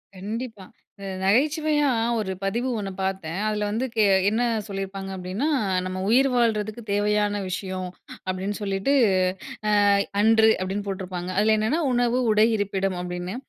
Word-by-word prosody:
கண்டிப்பா. 215 +1 -6 0.3
இந்த 200 - -9 0.2
நகைச்சுவையா 295 - +2 0.3
ஒரு 190 -3 -2
பதிவு 235 +6 -1
ஒன்னு 195 -2 -4
பார்த்தேன். 190 -2 -3
அதில 210 -1 -1
வந்து 225 +5 -1
கே 215 - +4 0.3
என்ன 220 +3 0 0.3
சொல்லியிருப்பாங்க 195 -1 -5
அப்பிடின்னா, 185 +9 -3 0.4
"நம்ம 185 0 -4
உயிர் 270 +4 +4
வாழ்றதுக்கு 225 -2 0
தேவையான 205 0 +1
விஷயம்" 185 0 -4 0.4
அப்பிடின்னு 190 +3 -3
சொல்லிட்டு, 195 +6 0 1.0
அ - - +5 0.3
அன்று 220 +1 +5
அப்பிடின்னு 195 +2 -3
போட்டிருப்பாங்க. 185 -2 -4
அதில 215 +1 +4
என்னென்ன 240 +11 0
"உணவு, 245 0 +2
உடை, 215 +1 +5
இருப்பிடம்" 195 -2 -1
அப்பிடின்னு. 180 +2 -5
205 Hz, 135 wpm, -24 LUFS, 190-225 Hz, 1.0 s, அ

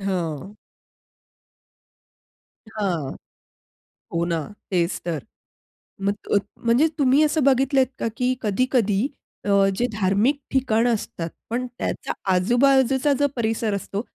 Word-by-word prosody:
हो. 185 -1 -3 2.2
हां. 175 -10 -2 1.0
हो 170 0 +1
ना, 170 -1 0 0.3
तेच 175 -1 +1
तर. 165 -3 -2 0.8
मत 200 +1 0 0.2
अत - - +6 0.3
म्हणजे 245 +7 +4
तुम्ही 275 +2 +5
असं 305 -1 +2
बघितलं 270 0 +3
आहेत 260 - +4
का - - 0
की 250 0 +2
कधी-कधी 220 0 +1 0.4
अ, - - -1 0.3
जे 240 +5 +1
धार्मिक 210 +7 +2
ठिकाण 245 -3 +2
असतात 190 -7 -2 0.2
पण 250 +2 -1
त्याचा - - -3 0.2
आजूबाजूचा 265 +7 +3
जो 285 - +4
परिसर 225 -2 0
असतो 200 +1 -3
225 Hz, 115 wpm, -23 LUFS, 195-260 Hz, 2.2 s, अत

